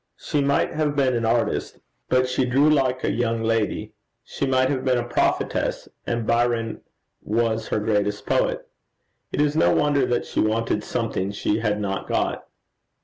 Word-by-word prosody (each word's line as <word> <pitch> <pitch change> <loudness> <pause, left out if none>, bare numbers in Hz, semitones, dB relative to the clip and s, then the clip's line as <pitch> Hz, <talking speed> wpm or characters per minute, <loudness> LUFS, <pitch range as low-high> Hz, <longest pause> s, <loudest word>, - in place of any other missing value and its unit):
She 145 - -1
might 140 0 +1
have 150 -2 -1
been 130 -3 +2
an 115 -1 0
artist, 115 +1 0 0.3
but 130 0 +3
she 125 +1 0
drew 130 +4 +3
like 130 -3 +1
a - - +1
young 115 +1 -1
lady; 115 -2 -1 0.3
she 140 - -3
might 130 0 +2
have 130 -2 -2
been 130 -2 +2
a 120 - 0
prophetess, - - 0 0.2
and 115 -1 -1
Byron 115 -1 0 0.4
was 110 0 0
her - - -1
greatest 105 -1 -1
poet. - - 0 0.6
It - - -3
is 150 0 +2
no 85 - +4
wonder 145 -3 +2
that 120 - 0
she - - -3
wanted 110 +1 0
something 95 +2 -2
she 105 +1 -1
had 105 -2 0
not 95 -1 -3
got. - - -1
120 Hz, 170 wpm, -23 LUFS, 110-130 Hz, 0.6 s, no